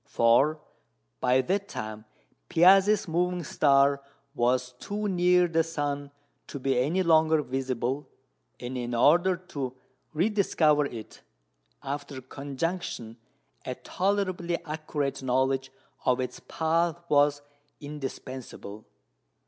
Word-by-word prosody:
For 135 Hz, +7 st, +3 dB, 0.6 s
by 125 Hz, -, +3 dB
that 195 Hz, +7 st, -1 dB
time 110 Hz, -, -6 dB, 0.4 s
Piazzi's 195 Hz, +4 st, +5 dB
moving 175 Hz, +1 st, 0 dB
star 140 Hz, -1 st, +3 dB, 0.3 s
was 125 Hz, -1 st, +1 dB
too 210 Hz, +1 st, -3 dB
near 180 Hz, -1 st, +3 dB
the 165 Hz, -1 st, +2 dB
sun 145 Hz, -3 st, -3 dB, 0.4 s
to -, -, -6 dB
be 135 Hz, 0 st, 0 dB
any 165 Hz, +9 st, +1 dB
longer 160 Hz, -2 st, +4 dB
visible, 130 Hz, +1 st, -2 dB, 0.5 s
and 125 Hz, +1 st, -5 dB
in 120 Hz, 0 st, -3 dB
order 175 Hz, +9 st, +4 dB
to 140 Hz, -8 st, -6 dB, 0.4 s
rediscover 155 Hz, -5 st, +2 dB
it 115 Hz, -5 st, -10 dB, 0.6 s
after 140 Hz, -1 st, -5 dB
conjunction 135 Hz, -2 st, -4 dB, 0.5 s
a 130 Hz, -, -4 dB
tolerably 185 Hz, -2 st, -1 dB
accurate 150 Hz, -3 st, -3 dB
knowledge 130 Hz, +1 st, 0 dB, 0.3 s
of 125 Hz, 0 st, +2 dB
its 125 Hz, -1 st, -4 dB
path 165 Hz, +1 st, 0 dB
was 145 Hz, -1 st, +3 dB, 0.4 s
indispensable. 130 Hz, -7 st, -7 dB
145 Hz, 105 wpm, -27 LUFS, 130-175 Hz, 0.6 s, Piazzi's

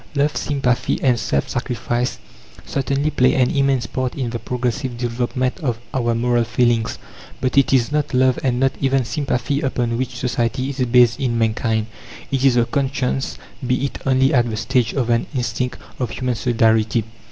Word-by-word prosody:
Love, 145 Hz, +1 st, +1 dB
sympathy 135 Hz, -4 st, 0 dB
and 125 Hz, -4 st, +3 dB
self 70 Hz, -9 st, 0 dB
sacrifice 120 Hz, 0 st, -2 dB, 0.5 s
certainly 140 Hz, +2 st, -1 dB
play 130 Hz, -2 st, +3 dB
an 125 Hz, -2 st, +3 dB
immense 135 Hz, -4 st, +1 dB
part 130 Hz, +4 st, -3 dB
in 125 Hz, -4 st, -2 dB
the 115 Hz, -, -3 dB
progressive 125 Hz, +1 st, -2 dB
development 125 Hz, +3 st, -1 dB
of 125 Hz, -8 st, -1 dB, 0.2 s
our 120 Hz, -3 st, +1 dB
moral 120 Hz, 0 st, +2 dB
feelings. 115 Hz, -1 st, +1 dB, 0.4 s
But 130 Hz, -, -1 dB
it 140 Hz, -1 st, +4 dB
is 130 Hz, -1 st, +3 dB
not 150 Hz, -1 st, 0 dB
love 130 Hz, 0 st, +3 dB
and 125 Hz, -2 st, +1 dB
not 135 Hz, 0 st, +3 dB
even 135 Hz, -2 st, +2 dB
sympathy 140 Hz, 0 st, -1 dB
upon 120 Hz, -4 st, -1 dB
which 130 Hz, -1 st, -3 dB
Society 125 Hz, +2 st, -1 dB
is 135 Hz, -, -9 dB
based 120 Hz, -2 st, +4 dB
in 120 Hz, -3 st, 0 dB
mankind. 110 Hz, -1 st, +1 dB, 0.5 s
It 135 Hz, -1 st, 0 dB
is 135 Hz, -3 st, +5 dB
the 120 Hz, -1 st, +4 dB
conscience 135 Hz, -1 st, -1 dB, 0.3 s
be 125 Hz, +2 st, +1 dB
it 140 Hz, -, -5 dB
only 135 Hz, +2 st, +3 dB
at 120 Hz, -2 st, +3 dB
the 110 Hz, -, -3 dB
stage 125 Hz, 0 st, +1 dB
of 120 Hz, -4 st, 0 dB
an 115 Hz, 0 st, +1 dB
instinct 125 Hz, 0 st, -2 dB, 0.2 s
of 125 Hz, -3 st, -1 dB
human 125 Hz, +1 st, -2 dB
solidarity. 115 Hz, -1 st, +2 dB
125 Hz, 175 wpm, -20 LUFS, 120-135 Hz, 0.5 s, is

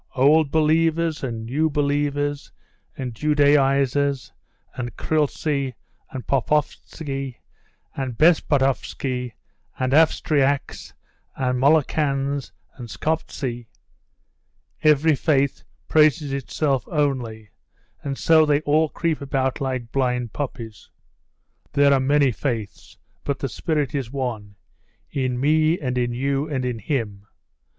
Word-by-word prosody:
Old 145 Hz, +3 st, +4 dB
believers 160 Hz, +1 st, +1 dB
and 115 Hz, -3 st, -4 dB
new 150 Hz, +7 st, +1 dB
believers 145 Hz, 0 st, -1 dB, 0.5 s
and 125 Hz, -3 st, -4 dB
Judaisers 140 Hz, -1 st, +2 dB, 0.4 s
and 120 Hz, -1 st, -5 dB
Khlysty 145 Hz, -3 st, -1 dB, 0.3 s
and 130 Hz, -2 st, -7 dB
Popovitzy, 135 Hz, 0 st, -2 dB, 0.6 s
and 130 Hz, -4 st, -4 dB
Bespopovitzy 135 Hz, -5 st, +1 dB, 0.4 s
and 130 Hz, 0 st, -1 dB
Avstriaks 145 Hz, -3 st, +1 dB, 0.4 s
and 125 Hz, -1 st, -1 dB
Molokans 140 Hz, -1 st, +1 dB, 0.3 s
and 120 Hz, -3 st, -8 dB
Skoptzy 130 Hz, -7 st, -3 dB, 1.1 s
every 155 Hz, +1 st, +4 dB
faith 140 Hz, -2 st, +1 dB, 0.3 s
praises 150 Hz, -2 st, +3 dB
itself 135 Hz, -1 st, -1 dB
only, 125 Hz, -, -2 dB, 0.5 s
and 135 Hz, -1 st, -4 dB
so 160 Hz, -1 st, +5 dB
they 150 Hz, -1 st, +2 dB
all 155 Hz, +1 st, +2 dB
creep 165 Hz, -1 st, -2 dB
about 135 Hz, 0 st, -1 dB
like 130 Hz, -4 st, -3 dB
blind 125 Hz, -3 st, -1 dB
puppies. 115 Hz, -7 st, -6 dB, 0.8 s
There 140 Hz, -1 st, +5 dB
are 135 Hz, -, +4 dB
many 140 Hz, 0 st, +3 dB
faiths, 110 Hz, -5 st, -5 dB, 0.3 s
but 140 Hz, -2 st, -2 dB
the 135 Hz, -, -3 dB
spirit 150 Hz, -5 st, -1 dB
is 135 Hz, -5 st, -2 dB
one 115 Hz, -7 st, -4 dB, 0.6 s
in 130 Hz, -3 st, -1 dB
me 155 Hz, +4 st, +3 dB
and 125 Hz, -4 st, -2 dB
in 120 Hz, -1 st, 0 dB
you 135 Hz, +4 st, -1 dB
and 130 Hz, -4 st, -2 dB
in 125 Hz, -2 st, -2 dB
him. 105 Hz, -5 st, -3 dB
140 Hz, 110 wpm, -23 LUFS, 125-150 Hz, 1.1 s, so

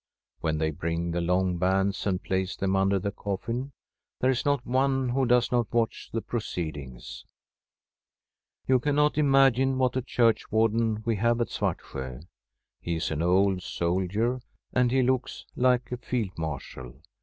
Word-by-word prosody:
When 80 Hz, -1 st, -1 dB
they 80 Hz, 0 st, 0 dB
bring 85 Hz, +2 st, -2 dB
the 85 Hz, +1 st, -1 dB
long 90 Hz, +1 st, +1 dB
bands 95 Hz, +2 st, +1 dB
and 95 Hz, -2 st, -1 dB
place 95 Hz, 0 st, -1 dB
them 95 Hz, 0 st, 0 dB
under 95 Hz, +1 st, +3 dB
the 100 Hz, +2 st, -2 dB
coffin, 115 Hz, +7 st, -4 dB, 0.5 s
there 130 Hz, -, +3 dB
is 125 Hz, -, -2 dB
not 140 Hz, -3 st, +1 dB
one 135 Hz, 0 st, +1 dB
who 130 Hz, +1 st, +1 dB
does 125 Hz, 0 st, +3 dB
not 120 Hz, -4 st, +1 dB
watch 115 Hz, -1 st, -1 dB
the 115 Hz, -, -2 dB
proceedings. 75 Hz, -, -5 dB, 1.4 s
You 130 Hz, -1 st, +4 dB
cannot 150 Hz, +3 st, +2 dB
imagine 135 Hz, -2 st, +4 dB
what 130 Hz, -1 st, +1 dB
a 130 Hz, -, +1 dB
churchwarden 115 Hz, -2 st, +1 dB
we 115 Hz, -2 st, +1 dB
have 115 Hz, +3 st, +2 dB
at 115 Hz, -4 st, 0 dB
Svartsjo. 65 Hz, 0 st, -4 dB, 0.6 s
He 85 Hz, -, -3 dB
is 80 Hz, 0 st, -2 dB
an 80 Hz, 0 st, -1 dB
old 95 Hz, +2 st, +3 dB
soldier, 95 Hz, +9 st, -1 dB, 0.3 s
and 125 Hz, -1 st, +3 dB
he 130 Hz, +1 st, +2 dB
looks 130 Hz, 0 st, -1 dB
like 125 Hz, -1 st, +2 dB
a 125 Hz, -, -2 dB
Field 115 Hz, -6 st, -3 dB
Marshal. 65 Hz, -5 st, -6 dB
110 Hz, 155 wpm, -27 LUFS, 90-125 Hz, 1.4 s, You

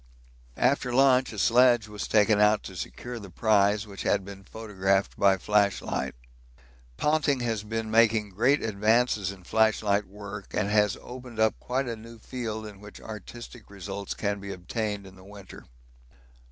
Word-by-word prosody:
After 125 Hz, 0 st, +1 dB
lunch 130 Hz, 0 st, +4 dB
a 110 Hz, -, -9 dB
sledge 120 Hz, +2 st, +4 dB
was 105 Hz, -1 st, -6 dB
taken 105 Hz, -1 st, +4 dB
out 105 Hz, 0 st, +4 dB
to 95 Hz, -, -9 dB
secure 120 Hz, +7 st, -6 dB
the 100 Hz, -3 st, -10 dB
prize, 105 Hz, +2 st, +2 dB
which 100 Hz, -2 st, -9 dB
had 100 Hz, -2 st, +1 dB
been 100 Hz, 0 st, -10 dB
photographed 100 Hz, -2 st, -1 dB
by 100 Hz, -1 st, +4 dB
flashlight. 100 Hz, -10 st, 0 dB, 0.8 s
Ponting 150 Hz, -3 st, +1 dB
has 115 Hz, -3 st, -1 dB
been 110 Hz, 0 st, -4 dB
making 110 Hz, -2 st, +3 dB
great 120 Hz, +9 st, +2 dB
advances 110 Hz, -1 st, +1 dB
in 95 Hz, -2 st, -13 dB
flashlight 105 Hz, 0 st, +2 dB
work, 100 Hz, 0 st, -9 dB
and 100 Hz, -1 st, 0 dB
has 105 Hz, -2 st, +3 dB
opened 125 Hz, -2 st, -9 dB
up 110 Hz, 0 st, +2 dB
quite 130 Hz, +1 st, -2 dB
a 115 Hz, -, -3 dB
new 115 Hz, +1 st, -12 dB
field 110 Hz, -2 st, -5 dB
in 105 Hz, -2 st, -10 dB
which 105 Hz, 0 st, -12 dB
artistic 110 Hz, +2 st, -10 dB
results 100 Hz, 0 st, -6 dB
can 100 Hz, -1 st, -2 dB
be 100 Hz, 0 st, -7 dB
obtained 100 Hz, +2 st, -4 dB
in 95 Hz, -, -13 dB
the 95 Hz, -, -16 dB
winter. 100 Hz, -1 st, -12 dB
105 Hz, 160 wpm, -27 LUFS, 100-115 Hz, 0.8 s, lunch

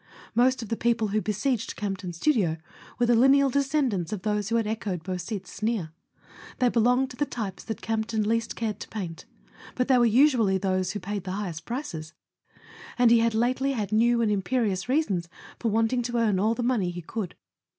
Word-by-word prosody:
Most 250 Hz, +2 st, +3 dB
of 220 Hz, -, -9 dB
the 230 Hz, -, 0 dB
people 230 Hz, -2 st, +1 dB
who 215 Hz, +2 st, +1 dB
besieged 215 Hz, +4 st, -1 dB
Campton's 195 Hz, -4 st, -4 dB
studio 195 Hz, -, +2 dB, 0.4 s
were 245 Hz, -, +2 dB
the 240 Hz, -, +4 dB
lineal 270 Hz, +3 st, +5 dB
descendants 270 Hz, -, 0 dB
of 210 Hz, -4 st, -4 dB
those 210 Hz, -1 st, -1 dB
who 230 Hz, -, 0 dB
had 230 Hz, -1 st, +2 dB
echoed 210 Hz, -6 st, -3 dB
Beausite's 185 Hz, +2 st, -5 dB
sneer. 215 Hz, -7 st, -2 dB, 0.7 s
They 250 Hz, -1 st, +3 dB
belonged 250 Hz, +3 st, +2 dB
to -, -, -9 dB
the 290 Hz, -, +1 dB
types 205 Hz, -6 st, -5 dB
that 220 Hz, -, -5 dB
Campton 220 Hz, 0 st, -1 dB
least 230 Hz, +2 st, 0 dB
cared 215 Hz, -3 st, -3 dB
to -, -, -7 dB
paint; 180 Hz, -6 st, -6 dB, 0.5 s
but 250 Hz, -, 0 dB
they 255 Hz, -2 st, +5 dB
were 240 Hz, -, +5 dB
usually 230 Hz, -5 st, +4 dB
those 185 Hz, -1 st, -1 dB
who 205 Hz, -, -3 dB
paid 200 Hz, 0 st, -4 dB
the 185 Hz, -, -4 dB
highest 185 Hz, -5 st, -4 dB
prices, 170 Hz, -, -5 dB, 0.8 s
and 245 Hz, -2 st, +5 dB
he 235 Hz, -, +6 dB
had 230 Hz, -1 st, +1 dB
lately 255 Hz, +4 st, +1 dB
had 215 Hz, -5 st, -3 dB
new 235 Hz, +2 st, +3 dB
and 215 Hz, -, +2 dB
im¬ 200 Hz, -2 st, 0 dB
perious 210 Hz, -2 st, -1 dB
reasons 200 Hz, -, 0 dB, 0.3 s
for 230 Hz, -, 0 dB
wanting 225 Hz, +3 st, +1 dB
to 240 Hz, 0 st, -2 dB
earn 215 Hz, -5 st, +2 dB
all 220 Hz, +4 st, +2 dB
the 245 Hz, -, -2 dB
money 235 Hz, -7 st, +1 dB
he 175 Hz, -1 st, -6 dB
could. 200 Hz, 0 st, -5 dB
220 Hz, 200 wpm, -26 LUFS, 195-240 Hz, 0.8 s, he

